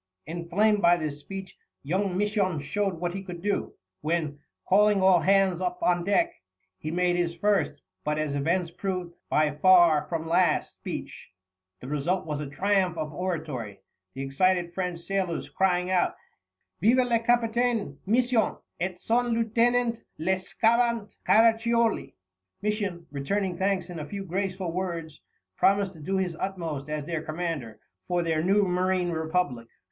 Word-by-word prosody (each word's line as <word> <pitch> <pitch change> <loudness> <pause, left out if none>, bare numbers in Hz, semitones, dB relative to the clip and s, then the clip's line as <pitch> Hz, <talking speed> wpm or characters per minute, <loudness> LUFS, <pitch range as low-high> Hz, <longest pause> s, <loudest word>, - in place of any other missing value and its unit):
Inflamed 180 +6 +1
by 175 -1 +5
this 150 -3 -4
speech, 190 +4 -8 0.3
young 185 +5 -1
Misson 200 -5 +1
showed 195 +5 -1
what 175 +1 -3
he 195 - -4
could 180 -3 -8
do, 205 +3 -2 0.3
when, 155 -2 -1 0.3
calling 205 +1 +5
all 190 -2 +5
hands 190 -1 +3
up 180 -1 -1
on 175 -1 +2
deck, 335 - +2 0.5
he 155 - -4
made 175 +1 +1
his 170 -1 0
first, 205 +3 0 0.2
but, 150 0 -1
as 155 -2 -1
events 165 +5 0
proved, 180 -1 -4 0.2
by 150 0 +3
far 165 -1 +5
from 165 -1 -3
last, 170 -1 +2
speech. - - -7 0.5
The 125 - -8
result 150 +6 -1
was 150 -2 -3
a 150 -2 -5
triumph 185 +2 +1
of 155 -1 -4
oratory, 150 - -4 0.3
the 135 - -4
excited 175 +5 +1
French 180 -1 -2
sailors 180 -1 -2
crying 180 -1 +1
out: 180 -1 +2 0.7
"Vive 235 +5 +5
le 235 -1 +3
Capitaine 230 - +1
Misson 240 +1 +2 0.2
et 180 +1 -3
son 240 +4 +1
Lieutenant 235 +1 +1 0.2
le 185 +5 +1
Scavant 230 +2 +1
Caraccioli!" 230 +1 +3 0.5
Misson, 205 -5 -2
returning 180 +7 -1
thanks 190 -1 0
in 170 - -6
a 150 - -6
few 200 -1 -5
graceful 190 -1 -2
words, 170 -4 -4 0.4
promised 195 -1 +3
to 160 - -14
do 190 +6 -2
his 180 -3 -1
utmost 165 -7 -4
as 150 -1 -3
their 165 -1 -2
commander 155 -8 -4 0.3
for 175 -1 +1
their 160 -2 0
new 195 +4 +3
marine 180 -1 +1
republic. 160 -7 -1
180 Hz, 150 wpm, -27 LUFS, 165-200 Hz, 0.7 s, by